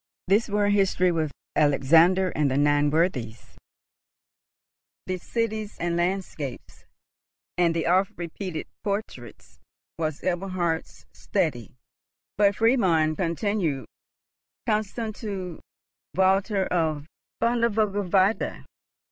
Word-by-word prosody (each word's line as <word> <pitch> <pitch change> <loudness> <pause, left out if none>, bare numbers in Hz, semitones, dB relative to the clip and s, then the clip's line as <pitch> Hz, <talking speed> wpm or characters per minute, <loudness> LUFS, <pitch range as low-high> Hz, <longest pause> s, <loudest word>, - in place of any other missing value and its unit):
This 205 +5 +3
World 205 0 +2
History, 185 -2 +3
with 160 -3 -1 0.2
Alexander 165 +6 +4
and 150 -2 +1
the 130 - 0
Nine 145 0 +3
Worthies, 145 -9 -1 1.5
the 185 0 -3
cities 220 +1 -3
and 170 0 -1
landscapes, 175 -7 -3 0.7
and 170 -2 +2
the 165 - 0
oft 190 +4 +2
repeated 175 0 -5 0.2
portraits, 200 - -5 0.4
was 155 -2 -2
Eberhard's 175 -2 -2
study; - - -2 0.6
but 200 -1 +3
Friedmund 185 -10 +3
continued—constant 205 - -3
to 190 -6 -5 0.6
Walther 190 +2 +2
of 155 -4 -1 0.3
Vögelweide. 210 -4 +1
185 Hz, 90 wpm, -25 LUFS, 160-205 Hz, 1.5 s, Alexander